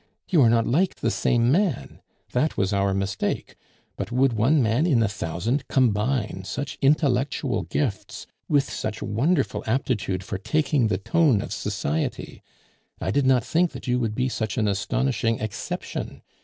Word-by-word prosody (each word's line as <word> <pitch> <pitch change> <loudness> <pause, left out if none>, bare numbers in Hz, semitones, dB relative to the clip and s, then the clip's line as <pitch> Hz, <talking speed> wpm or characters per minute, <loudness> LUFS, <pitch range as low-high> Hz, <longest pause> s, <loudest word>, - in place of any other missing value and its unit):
You 170 -5 +4
are 120 - +6
not 115 -1 +3
like 175 +9 +1
the 115 - -1
same 120 +5 +2
man. 165 - 0 0.3
That 150 +6 0
was 95 +1 +1
our 100 0 +2
mistake. 95 0 -2 0.4
But - - -4
would 130 +1 +3
one 125 +8 +3
man 120 +6 +2
in 125 -9 +3
a - - +2
thousand 100 - -2
combine 120 -3 +1
such 140 +9 -5
intellectual 140 -2 +1
gifts 120 -10 -3 0.2
with 145 -2 +4
such 110 0 -4
wonderful 140 - 0
aptitude 110 -6 -1
for 95 0 -5
taking 145 +2 +1
the 100 -3 0
tone 145 - +2
of - - -4
society? 75 +3 -3 0.6
I - - -2
did 140 +3 +2
not 130 -3 +4
think 170 +6 +1
that - - -8
you 125 -1 +1
would 110 -3 -1
be 125 +2 +1
such 110 -5 -3
an 110 - +2
astonishing 115 +3 0
exception. 110 -2 -5
120 Hz, 160 wpm, -24 LUFS, 105-140 Hz, 0.6 s, are